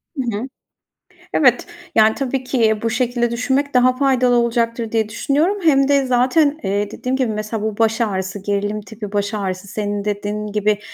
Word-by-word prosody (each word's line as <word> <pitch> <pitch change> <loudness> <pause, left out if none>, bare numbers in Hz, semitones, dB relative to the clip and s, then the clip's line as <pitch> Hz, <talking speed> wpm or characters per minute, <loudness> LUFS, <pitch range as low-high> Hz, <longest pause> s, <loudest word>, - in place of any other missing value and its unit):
Hı 240 -7 -2
hı. 245 - -4 0.9
Evet, - - +3 0.3
yani, 220 0 +5
tabii 265 -1 -2
ki 230 -4 +2
bu 230 - +1
şekilde 240 0 0
düşünmek 265 +4 0
daha 255 0 +4
faydalı 255 -2 +2
olacaktır 235 -1 0
diye 220 -2 0
düşünüyorum. 295 - 0
Hem 275 -4 +4
de 280 -1 +3
zaten, 275 +5 +2
eee, 200 +1 -1
dediğim 255 +3 -3
gibi 250 -4 0
mesela, 215 0 -4
bu 215 -1 -3
baş 225 +1 +1
ağrısı, 195 -2 -2
gerilim 205 +1 -2
tipi 210 -1 -9
baş 205 +1 -1
ağrısı 195 -2 -3
senin 205 0 -3
dediğin 210 +1 -3
gibi, 210 0 0
230 Hz, 170 wpm, -19 LUFS, 210-255 Hz, 0.9 s, yani